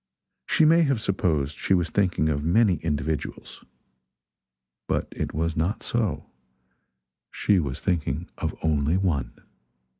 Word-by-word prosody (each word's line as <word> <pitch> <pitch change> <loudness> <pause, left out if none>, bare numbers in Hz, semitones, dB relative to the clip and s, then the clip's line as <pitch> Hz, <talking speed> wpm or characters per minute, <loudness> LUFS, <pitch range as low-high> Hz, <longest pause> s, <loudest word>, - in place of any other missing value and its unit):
She 160 - +4
may 165 +2 +6
have 140 -7 +2
supposed 80 -8 -1
she 95 - +2
was 85 -3 0
thinking 90 -6 +1
of 70 -1 -1
many 90 +2 +3
individuals, 75 -1 -4 1.2
but - - -1
it - - -4
was 80 +1 -1
not 85 +7 -1
so 110 - -1 1.0
she 100 -3 +2
was 70 -5 -3
thinking 80 -2 -1
of 80 -1 -2
only 75 +1 +2
one. 75 -11 -1
80 Hz, 125 wpm, -25 LUFS, 75-95 Hz, 1.2 s, may